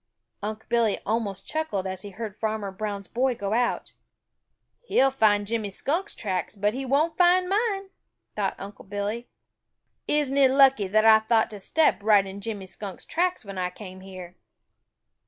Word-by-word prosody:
Unc' 215 +1 -5
Billy 235 -3 +2
almost 205 -3 -2
chuckled 310 -12 -2
as 190 -1 -4
he 205 - -7
heard 210 +1 -7
Farmer 215 -2 -2
Brown's 200 -1 -5
boy 255 +4 0
go 200 -1 -3
out. 240 +1 0 0.9
"He'll 270 - +3
find 210 -5 +3
Jimmy 220 -1 -2
Skunk's 325 - -2
tracks, 190 -1 -3
but 205 +1 0
he 265 +1 -4
won't 305 +6 +1
find 360 +1 +5
mine," 395 -1 -1 0.4
thought - - -1
Unc' 200 0 -10
Billy. 205 +4 -3 0.8
"Isn't 290 -2 +1
it 270 -2 +6
lucky 265 -6 +5
that 215 +3 +3
I 220 -1 +8
thought 220 +1 +2
to 210 - -8
step 310 +6 +2
right 205 -2 +4
in 195 +1 -8
Jimmy 205 -2 -5
Skunk's 190 0 -7
tracks 360 -5 -1
when 195 -1 -6
I 180 0 0
came 185 0 -10
here?" 185 -2 -10
220 Hz, 165 wpm, -26 LUFS, 200-270 Hz, 0.9 s, I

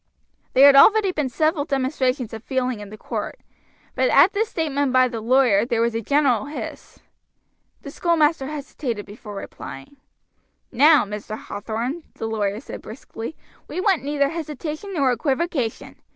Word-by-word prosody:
There 265 +2 +7
had 285 -1 +8
already 410 +6 +6
been 300 -6 -2
several 310 +4 +1
demonstrations 260 -3 -1
of 225 0 -7
feeling 255 -3 -1
in 210 +1 -9
court, - - -5 0.5
but - - +1
at 395 - +6
this 435 +2 0
statement 285 - -1
by 255 0 +5
the 235 -3 -5
lawyer 235 -3 +4
there 235 -1 -1
was 235 0 +1
a 230 - -2
general 275 -2 +2
hiss. 300 - -8 0.8
The - - -8
schoolmaster 320 -4 +1
hesitated 275 -7 -5
before 210 0 -10
replying. 195 - -9 0.7
"Now, 295 +2 +5
Mr. 210 +1 -6
Hathorn," 235 +11 -4
the - - -5
lawyer 210 -2 -1
said 270 - -9
briskly, 225 +3 -8 0.3
"we - - -5
want 380 -3 +2
neither 285 0 +1
hesitation 310 +3 -5
nor 275 -5 +2
equivocation. 265 0 -2
265 Hz, 150 wpm, -22 LUFS, 225-305 Hz, 0.8 s, had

